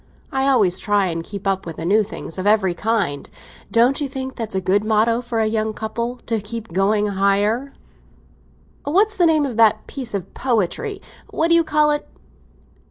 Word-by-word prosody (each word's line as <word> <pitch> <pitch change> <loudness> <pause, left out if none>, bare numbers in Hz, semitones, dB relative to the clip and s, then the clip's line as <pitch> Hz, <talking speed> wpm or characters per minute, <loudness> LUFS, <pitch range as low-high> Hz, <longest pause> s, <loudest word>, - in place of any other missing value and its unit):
I 270 0 0
always 200 -9 +3
try 205 -3 +1
and 165 0 -3
keep 200 +2 -8
up 195 -2 -1
with 165 - -6
the 165 - -6
new 205 +5 +4
things 195 -4 -6
of 190 - -2
every 205 -4 +3
kind. 195 -8 -1 0.4
Don't 245 +5 +3
you 285 - -2
think 265 -1 -5
that's 225 -4 -5
a - - +2
good 190 +3 +1
motto 220 +2 +2
for 235 -2 -3
a 220 - +2
young 215 0 -1
couple—to 230 0 -3
keep 220 -2 -7
'going 205 +3 +2
higher'? 205 +7 +1 1.1
That's 400 +9 +2
the 350 -2 +4
name 310 -2 +3
of 245 -5 -5
that 220 -1 +4
piece 250 -6 -3
of 195 -1 -5
poetry—what 320 - -2
do - - +7
they - - +2
call 300 -1 +2
it? 295 - -3
220 Hz, 180 wpm, -20 LUFS, 200-265 Hz, 1.1 s, do